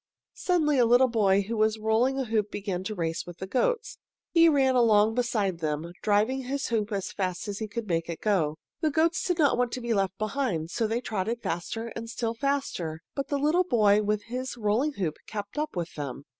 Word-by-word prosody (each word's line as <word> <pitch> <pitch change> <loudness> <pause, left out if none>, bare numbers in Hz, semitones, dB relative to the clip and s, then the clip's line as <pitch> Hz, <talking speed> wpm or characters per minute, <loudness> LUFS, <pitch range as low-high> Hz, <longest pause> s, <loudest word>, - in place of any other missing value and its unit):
Suddenly 305 -6 +1
a 240 - +6
little 245 +2 +6
boy 200 -4 +3
who 225 +4 -4
was 215 0 +2
rolling 220 +5 +2
a 265 - -1
hoop 215 -2 0
began 195 -3 -3
to 215 +1 -3
race 165 -2 -2
with 175 -1 -9
the 190 - -5
goats. 450 - -1 0.3
He 335 -1 +6
ran 270 -3 +3
along 220 -3 +4
beside 220 -7 0
them, 155 +1 -2
driving 215 +6 +2
his 280 +2 -2
hoop 220 -2 0
as 200 -2 -2
fast 185 -1 -3
as 205 -1 -4
he 220 - -3
could 230 +1 -5
make 165 -2 -1
it 165 - -4
go. 170 -8 +1 0.2
The 315 - +1
goats 325 +3 +1
did 355 -2 0
not 290 -6 +3
want 245 -1 +1
to - - -2
be 235 -1 0
left 195 -2 0
behind, 215 - -2
so 225 +3 0
they 230 +2 -1
trotted 220 +1 -3
faster 225 +7 -3
and 230 0 -6
still 230 -1 -2
faster, 230 - -2
but 275 -1 -3
the 285 - 0
little 305 +6 +3
boy 215 - +4
with 210 0 0
his 250 +2 -5
rolling 230 +7 +1
hoop 175 - -2
kept 205 +5 -5
up 305 -5 -3
with 170 -1 -3
them. 140 -1 -6
220 Hz, 215 wpm, -27 LUFS, 195-260 Hz, 0.3 s, a